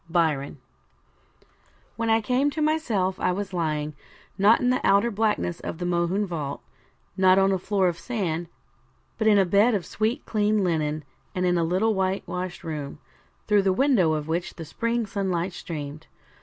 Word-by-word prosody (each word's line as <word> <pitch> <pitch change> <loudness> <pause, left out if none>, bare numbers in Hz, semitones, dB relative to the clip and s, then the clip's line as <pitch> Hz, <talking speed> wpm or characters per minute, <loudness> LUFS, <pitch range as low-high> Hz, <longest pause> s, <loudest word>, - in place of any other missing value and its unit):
Byron 155 -5 0 1.4
When 230 +1 -2
I 225 0 +4
came 255 +6 +1
to 310 +2 -4
myself 225 -12 0
I - - +1
was 195 +1 -4
lying, 155 -3 -1 0.4
not 205 +4 +5
in 250 - +2
the 255 - 0
outer 200 +4 +3
blackness 210 -5 0
of - - -6
the 175 - -4
Mohune 175 +3 +1
vault, 150 -6 -5 0.5
not 185 -1 +5
on 195 0 +4
a 190 - +1
floor 195 0 +1
of 170 -1 -2
sand; 175 -7 -3 0.7
but 220 - +1
in 210 -1 +6
a 195 - +4
bed 205 +6 +4
of 185 -5 -2
sweet 220 - -2
clean 210 -1 +1
linen, 155 -3 -1 0.3
and 185 0 0
in 180 0 +2
a 170 - +2
little 185 +7 +1
whitewashed 185 -2 -3
room, 150 -4 -5 0.5
through 210 -1 +4
the 195 -1 +2
window 220 - +3
of 155 -1 -3
which 170 +2 -2
the 165 - -7
spring 230 +8 -1
sunlight 190 -3 -2
streamed. 155 -2 -7
190 Hz, 170 wpm, -25 LUFS, 170-215 Hz, 1.4 s, in